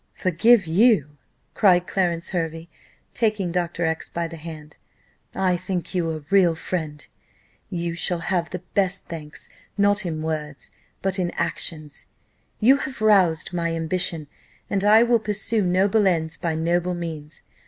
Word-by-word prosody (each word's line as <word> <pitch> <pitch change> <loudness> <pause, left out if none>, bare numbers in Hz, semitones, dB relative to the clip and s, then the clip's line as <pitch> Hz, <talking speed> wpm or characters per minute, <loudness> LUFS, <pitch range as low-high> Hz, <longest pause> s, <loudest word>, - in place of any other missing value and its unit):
"Forgive 195 +4 +3
you!" 170 - +3 0.4
cried 180 -3 +4
Clarence 175 -3 -1
Hervey, 165 -2 -3 0.5
taking 210 -6 0
Dr. 175 -1 -1
X 160 0 -2
by 170 0 -3
the 165 - -9
hand, 155 -2 -10 0.6
"I 185 -1 +2
think 180 0 -4
you 175 -3 0
a 155 -2 -5
real 185 -4 +4
friend; 160 -3 -4 0.6
you 170 -1 -3
shall 175 +1 0
have 175 -2 -1
the 180 0 -6
best 195 -1 0
thanks 155 -3 -9 0.3
not 205 +1 +3
in 160 -3 -4
words, 150 -3 -5 0.3
but 195 0 0
in 175 -1 0
actions: 160 -3 -4 0.5
you 255 +5 +5
have 270 -2 -6
roused 185 -6 +3
my 170 -1 -1
ambition, 165 -1 -1 0.5
and 200 -1 0
I 215 +2 +6
will 240 -1 +3
pursue 215 +1 -1
noble 195 +3 +2
ends 165 -3 +1
by 165 -2 -2
noble 175 +2 0
means. 160 -3 -6
175 Hz, 145 wpm, -23 LUFS, 160-195 Hz, 0.6 s, I